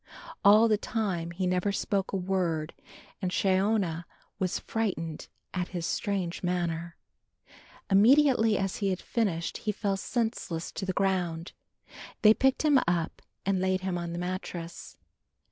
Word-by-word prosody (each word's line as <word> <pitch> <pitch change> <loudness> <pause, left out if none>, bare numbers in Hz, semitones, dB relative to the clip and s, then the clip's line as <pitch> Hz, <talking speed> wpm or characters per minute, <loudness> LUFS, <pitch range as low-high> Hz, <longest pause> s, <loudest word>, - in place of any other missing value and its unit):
All 210 +3 +7
the 215 -2 +2
time 190 -8 -2
he 180 +2 -3
never 180 +2 +1
spoke 195 -1 -1
a 195 - 0
word 180 -4 -1 0.5
and 185 - 0
Shiona 190 -3 +1 0.3
was 185 -2 0
frightened 180 -8 -3 0.3
at 180 -1 -1
his 175 -3 -4
strange 190 -4 -2
manner. 170 -2 -2 0.9
Immediately 225 +1 +5
he 200 +2 -2
had 185 -1 -1
finished 190 -9 -1
he 215 - -2
fell 200 -1 -1
senseless 220 -7 -2
to 190 - -5
the 185 - 0
ground. 180 -3 0 0.7
They 215 0 +9
picked 265 +5 +2
him 290 -3 +6
up 170 -2 -1 0.2
and 195 -1 +1
laid 185 0 +1
him 190 -1 -2
on 170 0 -4
the - - -4
mattrass. 180 -2 -5
190 Hz, 140 wpm, -29 LUFS, 175-205 Hz, 0.9 s, They